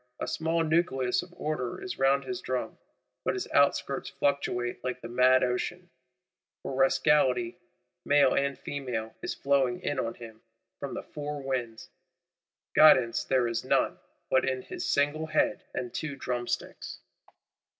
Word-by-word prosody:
A - - -3
small 165 +1 0
nucleus 155 -6 +1
of 180 - -12
Order 150 -6 -3
is 185 - -6
round 135 +1 +3
his 375 -1 -5
drum; - - -3 0.4
but - - 0
his 380 - -3
outskirts 140 -1 +2
fluctuate 120 -4 -1
like 125 -1 -3
the 115 - -7
mad 130 +2 +4
Ocean: 175 +8 -2 0.7
for - - -4
Rascality 135 -2 +2 0.4
male 145 -2 +4
and 140 -1 0
female 125 -6 -4
is - - -3
flowing 135 -3 +1
in 145 -2 -2
on 115 -2 -2
him, 110 -2 -11 0.4
from - - -5
the - - -5
four 150 0 -6
winds; 120 -4 -4 0.8
guidance 130 -7 +6
there 130 -2 +2
is 115 0 -2
none - - +1 0.3
but 130 - +4
in 130 -1 -1
his - - -5
single 145 +2 +1
head 155 0 +1
and 120 -2 -4
two 155 -3 -3
drumsticks. 125 -2 -4
135 Hz, 145 wpm, -29 LUFS, 125-145 Hz, 0.8 s, guidance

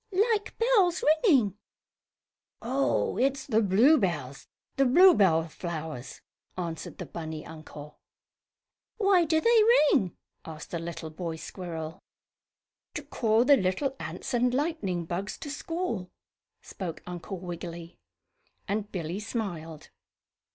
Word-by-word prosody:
"Like 420 0 -3
bells 405 -7 +3 0.2
ringing." 235 - +3 1.0
"Oh, 260 +4 0
it's 270 +1 +1
the 225 -4 +2
bluebells 190 - +2 0.3
the 275 - +3
bluebell 245 - +5
flowers," 160 -6 -6 0.4
answered 165 -3 -5
the - - -6
bunny 160 -2 -6
uncle. 150 -2 -11 1.0
"Why 390 -5 +4
do 320 0 +2
they 465 +4 +5 0.3
ring?" 185 -5 0 0.3
asked 160 -1 -9
the 170 - -2
little 165 -1 -6
boy 165 0 -4
squirrel. 165 -1 -7 1.0
"To - - -4
call 225 +1 +1
the 285 - +7
little 210 +9 -1
ants - - -6
and 245 +1 +2
lightning 255 - -1
bugs 180 +5 -4
to 290 - -7
school," 290 - -3 0.5
spoke 175 -4 -7
Uncle 180 +2 -6
Wiggily, 170 -1 -7 0.7
and 205 +1 -2
Billy 175 +1 -4
smiled. 175 -9 -5
190 Hz, 115 wpm, -28 LUFS, 165-275 Hz, 1.0 s, the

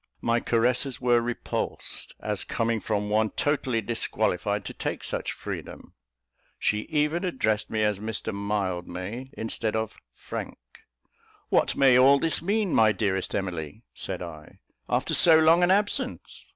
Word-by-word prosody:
My 115 0 +2
caresses 125 +3 +1
were 120 -1 +3
repulsed, 120 0 -3
as - - -2
coming 115 0 -1
from 105 -1 -2
one 110 +1 +2
totally 130 -5 0
disqualified 105 -3 -1
to - - -6
take - - -4
such - - -3
freedom. - - -7 0.6
She 105 0 -1
even 150 +4 +1
addressed 110 - 0
me 110 -1 0
as 105 -2 +1
Mr 110 0 -4
Mildmay, 100 +3 -3
instead 110 0 -2
of 110 -1 -3 0.2
"Frank." - - -6 0.9
"What - - +2
may 130 -2 +6
all 135 +2 +7
this 160 +3 +1
mean, 205 +1 0
my 110 -1 +5
dearest 95 -2 -1
Emily," 90 +1 -4
said 90 -2 -4
I, 80 -3 -10 0.3
"after - - 0
so 165 -2 +7
long 160 +2 +5
an 175 - +4
absence? 205 +2 -1
110 Hz, 140 wpm, -26 LUFS, 100-135 Hz, 0.9 s, all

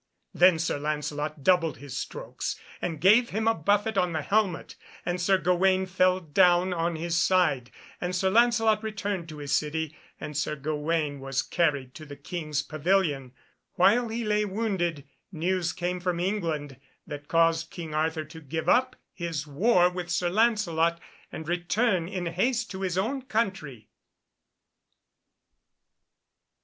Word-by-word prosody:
Then 180 -1 +5
Sir 160 -2 -1
Lancelot 150 0 -3
doubled 180 -2 +3
his 140 -3 -9
strokes, - - -5 0.2
and 165 -4 -3
gave 220 +7 +5
him 220 +2 -1
a 225 - +5
buffet 205 +4 +1
on 180 -2 0
the 155 -2 -2
helmet, 200 -3 0 0.3
and 180 0 -2
Sir 190 +2 +3
Gawaine 185 +2 +2
fell 185 0 +2
down 180 +2 +3
on 170 0 -1
his 165 +1 -2
side. 165 -8 +2 0.3
And 180 +1 -2
Sir 190 +1 +1
Lancelot 225 -1 +4
returned 200 -5 -4
to 155 - -8
his 145 -1 -6
city, 155 +1 -2 0.2
and 150 - -7
Sir 150 +1 -1
Gawaine 150 0 -2
was 135 -1 -2
carried 140 -7 0
to 155 +1 -11
the 145 - -8
King's 150 0 -3
pavilion. 155 -5 0 0.4
While 220 +7 +4
he 230 +1 -3
lay 210 0 +2
wounded, 190 -7 -2 0.2
news 175 0 -1
came 180 +1 -3
from 180 -1 -1
England 165 -8 -2 0.3
that 145 0 -8
caused 165 0 +2
King 165 -3 -7
Arthur 160 +1 0
to 160 +2 -12
give 160 +2 -4
up 255 +1 +3 0.2
his 165 -5 -4
war 180 +5 +3
with 180 -1 -5
Sir 175 0 0
Lancelot, 175 -7 +2 0.3
and 160 - -7
return 175 +2 0
in 180 -1 -4
haste 235 +8 0
to 190 -1 -6
his 185 -2 -1
own 245 +8 -1
country. 195 - -3
175 Hz, 150 wpm, -27 LUFS, 155-195 Hz, 0.4 s, Then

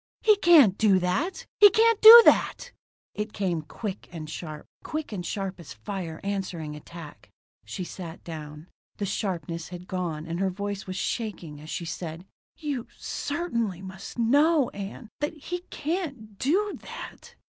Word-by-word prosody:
"He 430 -1 +6
can't 300 - +6
do 205 -3 +5
that! 185 - -1
He 415 -1 +10
can't 450 +2 +3
do 460 +2 +13
that!" - - +3 0.4
It 210 0 -4
came 180 -5 -1
quick 185 +7 -7
and 160 -3 -7
sharp. 155 -1 -7 0.2
Quick 310 -4 -4
and 190 -4 -4
sharp 195 0 -4
as 150 -10 -10
fire 160 - -6
answering 185 -6 -4
attack. 155 0 -11 0.4
She 110 - -5
sat 175 -1 -8
down. 150 -2 -8 0.3
The 205 - -2
sharpness 170 -5 -3
had 180 0 -9
gone 170 -4 -3
and 170 +1 -4
her 195 0 +1
voice 200 +1 -5
was 185 - -5
shaking 180 -11 -4
as 155 - -11
she 170 - -4
said: 165 +1 -6 0.3
"You 285 -7 -4
certainly 235 - -3
must 190 +4 -9
know, 285 +5 +3
Ann, 205 +3 -8
that 295 +2 -2
he 355 +4 -5
can't 280 - -4
do 390 +10 0
that." - - -10
195 Hz, 155 wpm, -26 LUFS, 170-275 Hz, 0.4 s, do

